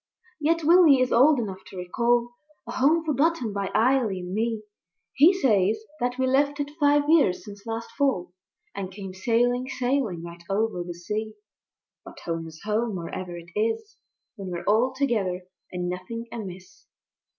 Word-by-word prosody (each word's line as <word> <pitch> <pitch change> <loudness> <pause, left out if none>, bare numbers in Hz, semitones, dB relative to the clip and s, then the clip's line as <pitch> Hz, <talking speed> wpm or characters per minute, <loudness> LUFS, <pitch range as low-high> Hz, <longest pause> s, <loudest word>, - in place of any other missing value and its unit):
Yet 325 +2 +1
Willy 325 -4 +7
is 255 0 +1
old 280 +5 +6
enough 195 -5 -4
to 190 - -11
recall 235 +6 +1 0.3
A 235 - -7
Home 305 +7 +2
forgotten 300 -6 +1
by 200 -1 -2
Eily 220 -2 +2
and 180 +1 -6
me; 225 0 -1 0.5
He 305 +6 +7
says 220 - +2 0.2
that 245 0 -1
we 260 - +1
left 285 +3 +2
it 290 0 -2
five 290 0 +4
years 295 - +3
since 205 0 -11
last 225 0 -4
Fall, 265 -12 0 0.4
And 195 -2 -5
came 195 -1 -8
sailing, 245 +5 +1
sailing, 245 -10 -1
right 170 0 -9
over 210 -2 0
the 175 0 -7
sea. 215 +5 -4 0.7
But - - -12
Home 165 -1 -4
is 160 0 -13
Home 215 +1 -1
wherever 175 0 -5
it 170 0 -12
is, 225 - -1 0.4
When 195 -2 -6
we're 175 -1 -4
all 225 +5 +3
together 215 -10 -1 0.3
and 180 -1 -3
nothing 185 +6 -5
amiss. 190 -2 -9
225 Hz, 160 wpm, -25 LUFS, 185-265 Hz, 0.7 s, Willy